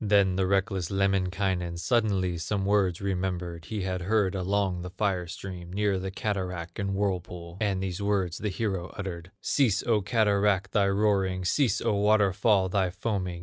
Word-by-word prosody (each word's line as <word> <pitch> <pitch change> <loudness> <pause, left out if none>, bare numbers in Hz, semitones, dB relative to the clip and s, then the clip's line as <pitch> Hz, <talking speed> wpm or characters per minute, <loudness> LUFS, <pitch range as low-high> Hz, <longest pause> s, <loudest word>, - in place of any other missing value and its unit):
Then 100 -3 +3
the 95 0 +1
reckless 95 -2 0
Lemminkainen 95 -2 0
Suddenly 95 -4 +1
some 95 +4 -2
words 100 -3 +2
remembered, 90 -3 -3
He 105 +1 -4
had 90 -1 -2
heard 100 0 +1
along 95 -1 0
the 90 - -6
fire 95 -2 -1
stream 90 0 -7
Near 100 0 +1
the 95 +1 -4
cataract 95 -4 -3
and 100 -1 -1
whirlpool, 90 -3 -3
And 100 -3 0
these 95 0 -3
words 95 -4 0
the 105 - -1
hero 95 -3 -2
uttered: 90 -3 -5
"Cease, 115 -8 +2
O 110 -3 +2
cataract, 100 -3 +2
thy 100 -3 +3
roaring, 100 -2 +1
Cease, 130 +6 +2
O - - +1
waterfall, 100 -1 +3
thy 95 -1 +1
foaming! 90 -2 -3
95 Hz, 160 wpm, -28 LUFS, 90-100 Hz, -, Then